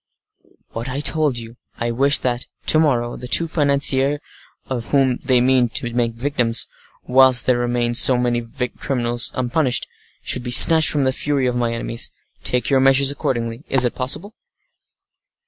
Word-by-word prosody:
"What 115 +3 -7
I 135 +2 -4
told 150 -3 0
you—I 115 0 -7
wish 140 +4 +2
that, 125 -1 -3 0.2
to 155 - +4
morrow, 120 -6 -1
the 125 - -9
two 165 +6 +3
financiers 140 -2 +2 0.5
of 120 -3 -5
whom 135 -3 0
they 130 -2 0
mean 125 -1 +1
to 120 +1 -4
make 120 -1 -1
victims, 120 -2 0 0.4
whilst 130 -1 +3
there 125 -1 +1
remain 120 0 -2
so 125 +1 +5
many 120 -1 -1 0.4
criminals 120 -3 -1
unpunished, 130 0 -1 0.4
should - - -2
be 125 - -7
snatched 160 +6 +7
from 145 -2 +1
the 130 0 0
fury 140 -1 -2
of 125 -1 -2
my 120 -1 -2
enemies. 115 0 -3 0.3
Take 125 -2 -2
your 135 -2 +2
measures 135 +1 +3
accordingly. 120 -2 -4
Is 130 -2 +2
it 120 - -2
possible?" 145 - -3
125 Hz, 160 wpm, -19 LUFS, 120-140 Hz, 0.5 s, snatched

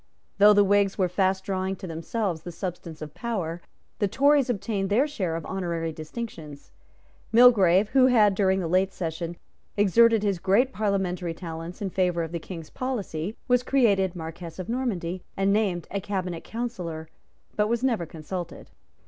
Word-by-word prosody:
Though 210 +1 +8
the 205 0 +5
Whigs 200 0 +2
were 185 -3 +2
fast 190 +1 0
drawing 190 0 -2
to 190 - -9
themselves 170 +1 -3
the 175 - -7
substance 165 -3 -6
of 150 -1 -9
power, 175 -8 -3 0.4
the 205 - +2
Tories 280 +4 +3
obtained 200 -3 -1
their 235 +8 +3
share 190 - -3
of 165 - -5
honorary 170 -4 -3
distinctions. 155 -3 -8 0.6
Mulgrave, 215 -5 +6
who 260 0 +5
had, 215 -5 +5
during 190 -1 +2
the 170 - -2
late 185 +3 +2
session, 170 -1 -4 0.4
exerted 220 +2 +5
his 200 -4 0
great 205 +9 +2
parliamentary 190 -5 -1
talents 165 +2 -7
in 195 - -2
favour 180 -2 +1
of 165 - -6
the 170 - -3
King's 165 -1 -9
policy, 210 -7 -4
was 250 -1 +4
created 205 -9 +2
Marquess 165 0 -7
of 185 - -6
Normanby, 190 -8 -2 0.2
and 195 +1 +2
named 195 -6 0
a 200 - -2
Cabinet 185 -4 -3
Councillor, 180 -10 -5 0.5
but 210 0 +1
was 235 +1 0
never 230 -10 0
consulted. 170 +3 -7
190 Hz, 165 wpm, -26 LUFS, 170-215 Hz, 0.6 s, Though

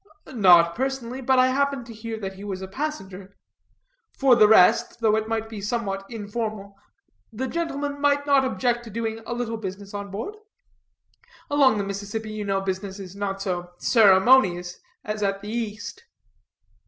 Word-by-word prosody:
"Not 175 -6 +6
personally. 260 0 -3
I - - -7
but 260 +1 +2
happened 265 0 +2
to 230 - -10
hear 225 0 -6
that 195 -1 -4
he 195 +1 -11
was 190 -2 -5
a - - -5
passenger. 195 -7 -6 0.8
For 270 -3 +5
the 215 -2 +6
rest, 220 +4 +4
though 220 -2 +3
it 220 0 -1
might 225 0 -2
be 220 -2 -8
somewhat 195 -2 -3
informal, 210 -2 -5 0.6
the 255 +4 -4
gentleman 285 -3 -3
might 285 0 +2
not 280 -2 +4
object 245 -2 0
to - - -9
doing 225 +1 -4
a - - -3
little 235 -2 -3
business 200 -1 -7
on 200 0 -5
board. 225 - -6 1.1
Along 275 -6 +4
the 200 - -1
Mississippi, 205 +2 -5
you 215 -1 -4
know, 195 -1 -1
business 190 +1 -4
is 190 -2 -9
not 195 -1 -3
so 180 -2 -4
ceremonious 190 -5 +4 0.3
as 210 0 -4
at 195 -1 -1
the 205 - -6
East." 215 -3 -5
215 Hz, 165 wpm, -24 LUFS, 195-245 Hz, 1.1 s, Not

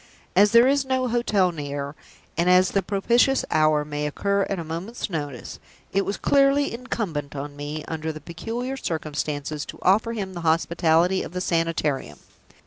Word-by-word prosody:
As 205 +3 +6
there 235 +2 +7
is 280 0 +3
no 260 -1 0
hotel 215 -6 +2
near, 145 -2 -5 0.4
and 170 +2 +2
as 180 0 +5
the 195 - +2
propitious 235 +7 +2
hour 155 -1 +3
may 150 0 -3
occur 200 +6 0
at 195 - -1
a 170 - -4
moment's 175 +8 -5
notice, 145 -6 -5 0.3
it 195 +1 +2
was 200 - -2
clearly 280 0 +3
incumbent 190 - -4
on 145 +1 -6
me, 145 +1 -5
under 160 0 -3
the 155 - -8
peculiar 230 - -5
circumstances, 150 - -3
to - - -8
offer 220 +5 +3
him 195 -4 -4
the 175 - -6
hospitality 165 +2 +2
of - - -7
the 180 - -2
Sanitarium. 160 - -1
175 Hz, 165 wpm, -24 LUFS, 150-220 Hz, 0.4 s, there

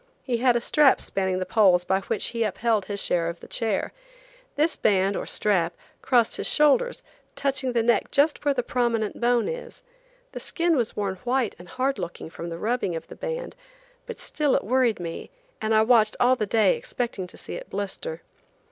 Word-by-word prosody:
He 245 -3 -1
had 245 0 +3
a 240 - +1
strap 295 +2 +4
spanning 190 -1 -2
the 185 - -2
poles 185 -5 +4
by 190 +1 +2
which 205 +1 -2
he 230 -1 -4
upheld 220 -1 0
his 200 +1 -3
share 170 -3 +1
of 170 0 -7
the - - -12
chair. 220 -4 -1 0.6
This 310 +3 +2
band, 195 0 +2
or - - -4
strap, 175 -5 +1 0.3
crossed 240 -4 +2
his - - -1
shoulders, 470 - +3 0.3
touching 265 -2 0
the 230 -1 +2
neck 235 +1 +2
just 295 +2 +2
where 285 -1 +2
the 245 - 0
prominent 235 -4 -1
bone 240 0 +2
is. - - -7 0.5
The - - -6
skin 340 -1 0
was 240 -5 -1
worn 195 -2 -2
white 245 +1 -1
and 175 0 -13
hard 260 +1 -1
looking 170 -2 -6
from 170 +1 -7
the 165 - -5
rubbing 215 -3 -1
of 165 - -7
the - - -9
band; - - -5 0.5
but - - -7
still 295 -3 0
it - - 0
worried 245 -1 +2
me, 165 -1 -6 0.3
and 215 - -1
I 220 0 +5
watched 220 -2 +4
all 250 +1 +5
the 215 -4 -2
day 225 - +3
expecting 245 - -4
to - - -15
see - - -8
it - - -7
blister. 205 - -5
230 Hz, 200 wpm, -25 LUFS, 195-265 Hz, 0.6 s, I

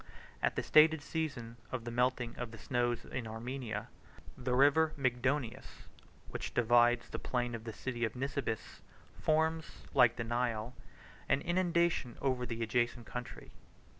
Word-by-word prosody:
At - - +1
the - - -1
stated 155 0 +6
season 140 -9 -3
of 130 -3 -3
the 120 - -4
melting 125 0 0
of 120 -1 -4
the 115 - -10
snows 120 +1 -1
in 120 -3 -5
Armenia, 115 -1 -4 0.5
the 125 0 -1
River 145 +4 +5
Mygdonius, 130 -1 -1 0.4
which - - -5
divides 120 0 +4
the - - -4
plain 120 -1 -1
and 115 -1 -6
the 115 - -4
city 120 +2 -4
of 115 - -1
Nisibis, 130 -3 -3 0.4
forms, 160 +1 0
like 120 -1 +6
the 115 - -3
Nile, 120 0 -1 0.5
66 - - -25
an 140 - +3
inundation 170 -7 +1
over 130 -2 0
the 115 0 -3
adjacent 120 +1 0
country. 125 -1 -7
125 Hz, 150 wpm, -33 LUFS, 115-140 Hz, 0.5 s, stated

